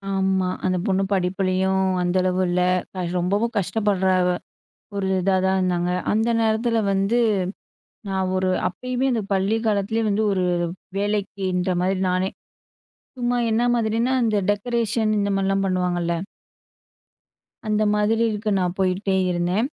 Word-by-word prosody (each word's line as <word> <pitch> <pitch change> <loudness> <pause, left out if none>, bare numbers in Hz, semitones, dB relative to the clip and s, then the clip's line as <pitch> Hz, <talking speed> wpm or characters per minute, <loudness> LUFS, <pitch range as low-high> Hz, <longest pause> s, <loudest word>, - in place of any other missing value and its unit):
ஆமா. 190 -1 +1 0.2
அந்த 185 0 +1
பொண்ணு 195 0 +2
படிப்புலயும் 190 0 +1 0.2
அந்த 180 +1 0
அளவு 185 0 +1
இல்ல. 180 +1 +1 0.6
ரொம்பவும் 200 +6 0
கஷ்டப்படுற, 200 -1 +1 0.8
ஒரு 195 -1 -1
இதாதான் 190 0 +2
இருந்தாங்க. 180 -1 0 0.2
அந்த 220 +2 +1
நேரத்தில 225 +1 +1
வந்து, 195 +5 +1 0.9
நான் 190 -1 -1
ஒரு 185 0 +1 0.2
அப்பயுமே, 250 +7 -3
அந்த 225 -3 0
பள்ளி 195 +3 +1
காலத்திலேயே 215 +2 0
வந்து 210 +2 +1
ஒரு 185 -2 0 0.5
வேலைக்கின்ற 195 -3 -1
மாரி 185 +1 0
நானே, 185 +1 0 0.9
சும்மா 245 0 0
என்ன 225 +2 +2
மாதிரின்னா? 230 +3 +1
இந்த 215 -2 +1
டெக்கரேஷன் 225 +1 0
இந்த 200 0 0
மாரிலா 195 0 +1
பண்ணுவாங்கள்ல. 180 -2 0 1.5
அந்த 215 0 +1
மாதிரி 215 +2 +2
இருக்கு, 210 0 -3
நான் 180 -1 -1
போயிக்கிட்டே 190 +1 +1 0.2
இருந்தேன். 180 +6 0
195 Hz, 120 wpm, -23 LUFS, 185-220 Hz, 1.5 s, பொண்ணு